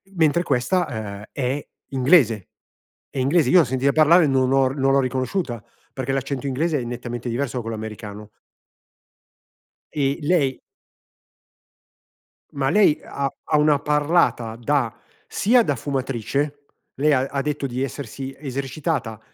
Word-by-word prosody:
mentre 160 0 +3
questa, 155 +5 +1
ehm, 105 -4 -6
è 135 +2 -2 0.2
inglese 130 - +3 0.7
è - - -3
inglese, 140 +2 +3
io 180 - +7
l'ho - - +6
sentita 130 +2 +1
parlare 160 +2 +6
non 130 -1 +2
ho 135 -1 +4
r 135 - -6
non 135 -1 +2
l'ho 140 - +5
riconosciuta 130 - -2 0.3
perché 130 0 -3
l'accento 135 0 -2
inglese 150 +3 0
è - - -4
nettamente 120 0 -5
diverso 125 +2 -2
da - - -1
quello 115 -1 -5
americano. 105 -1 -8 1.6
E 140 0 0
lei 145 -4 +1 1.9
Ma 135 -1 -1
lei 195 -3 +4
ha 140 -1 -3
ha 150 - +2
una 150 -1 +4
parlata 150 -6 +1
da, 120 0 0 0.3
sia 240 +3 +3
da 145 - 0
fumatrice, 140 +2 -3 0.3
lei 150 +3 +2
ha 130 - +3
ha 140 0 -2
detto 150 -1 -2
di 130 -1 -3
essersi 135 0 -5
esercitata 135 -3 -3
135 Hz, 140 wpm, -22 LUFS, 125-150 Hz, 1.9 s, io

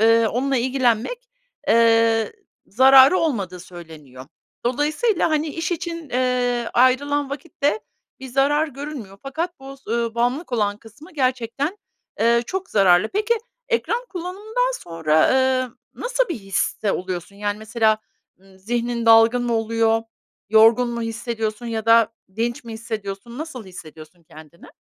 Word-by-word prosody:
eee, 225 0 +5
onunla 270 +3 0
ilgilenmek, 260 - 0 0.4
eee, 230 - +4 0.3
zararı 265 - +7
olmadığı 195 - -2
söyleniyor. 155 -8 -12 0.4
Dolayısıyla, 305 - +1
hani, 310 0 0
iş 325 +3 -3
için, 335 -2 -5
eee, 245 -1 0
ayrılan 275 +3 +2
vakitte 285 +6 -2 0.4
bir 265 - -8
zarar 290 +4 +2
görünmüyor. 275 -8 -8
Fakat 320 +4 -4
bu 270 0 -10
s 265 - -12
ııı, 235 -1 -1
bağımlılık 245 +6 -1
olan 205 -3 0
kısmı 280 - -16
gerçekten, 260 - -1 0.4
eee, 235 +1 +3
çok 380 0 -4
zararlı. 190 0 +4
Peki, 425 +3 +1 0.3
ekran 475 +1 -1
kullanımından 420 +8 -3
sonra, 160 -2 +2
eee, 260 -1 +2 0.3
nasıl - - -1
bir 345 - -2
histe 195 +1 -1
oluyorsun? 185 +1 -5
Yani 205 0 -3
mesela, 220 0 +1 0.4
ııı, 190 -1 -21
zihnin 235 +3 -2
dalgın 225 +2 +6
mı 240 -1 0
oluyor, 225 0 +1 0.5
yorgun 225 +3 +5
mu 235 -1 -4
hissediyorsun 225 0 -4
ya 225 -1 -4
da 230 0 +5 0.2
dinç 235 +1 -2
mi 230 - -8
hissediyorsun, 220 +1 -6
nasıl 295 -9 -7
hissediyorsun 170 -2 -13
kendini? 155 +1 -15
235 Hz, 135 wpm, -22 LUFS, 220-280 Hz, 0.5 s, zararı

